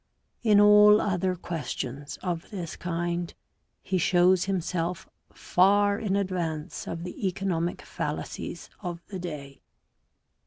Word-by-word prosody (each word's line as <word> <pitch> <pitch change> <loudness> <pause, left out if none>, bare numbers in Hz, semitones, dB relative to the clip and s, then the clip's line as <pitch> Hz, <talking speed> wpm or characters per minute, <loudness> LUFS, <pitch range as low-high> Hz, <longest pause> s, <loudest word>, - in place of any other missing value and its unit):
In 210 -3 +5
all 210 0 +8
other 185 -2 0
questions 145 -4 -5
of 175 -2 -3
this 180 -6 -5
kind 175 0 -2 0.5
he 190 -1 0
shows 180 +1 +4
himself 180 -1 -2 0.2
far 200 +2 +3
in 205 -4 -1
advance 175 -5 -2
of 165 0 -4
the 180 +2 -3
economic 175 -2 -2
fallacies - - -5
of 175 -3 -6
the 190 -2 -5
day. 145 -6 -7
180 Hz, 115 wpm, -27 LUFS, 170-195 Hz, 0.5 s, all